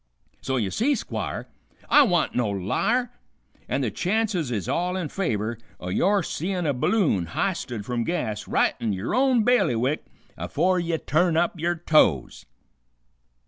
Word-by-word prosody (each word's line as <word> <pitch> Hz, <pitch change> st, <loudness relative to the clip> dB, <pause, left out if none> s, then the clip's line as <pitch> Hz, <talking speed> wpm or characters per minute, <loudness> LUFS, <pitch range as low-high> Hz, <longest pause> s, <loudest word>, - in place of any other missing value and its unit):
So 130 Hz, 0 st, -1 dB
ye 105 Hz, -6 st, -1 dB
see, 280 Hz, +6 st, +1 dB
Squire, -, -, -4 dB, 0.4 s
I 295 Hz, -, +7 dB
wa'n't 180 Hz, -, +2 dB
no 120 Hz, -4 st, 0 dB
liar, 220 Hz, -, 0 dB, 0.6 s
an' -, -, 0 dB
the -, -, -1 dB
chances 195 Hz, -, 0 dB
is 105 Hz, -7 st, -3 dB
all 180 Hz, +2 st, -1 dB
in 170 Hz, -5 st, -3 dB
favor 115 Hz, -, -2 dB, 0.2 s
o' 90 Hz, -, -6 dB
your 195 Hz, -, +2 dB
seein' 180 Hz, +3 st, -3 dB
a 145 Hz, -, +1 dB
balloon 125 Hz, -, +1 dB
h'isted 120 Hz, -, -2 dB
from 120 Hz, 0 st, -1 dB
gas 115 Hz, -10 st, -3 dB
right -, -, +2 dB
in 110 Hz, -3 st, -1 dB
yer 95 Hz, +4 st, -3 dB
own 255 Hz, -3 st, +3 dB
bailiwick 155 Hz, -, +2 dB, 0.3 s
afore 155 Hz, -, 0 dB
ye 170 Hz, -1 st, -1 dB
turn 160 Hz, +2 st, +1 dB
up 170 Hz, 0 st, 0 dB
yer 175 Hz, +2 st, 0 dB
toes." 155 Hz, -, +2 dB
165 Hz, 150 wpm, -25 LUFS, 115-195 Hz, 0.6 s, I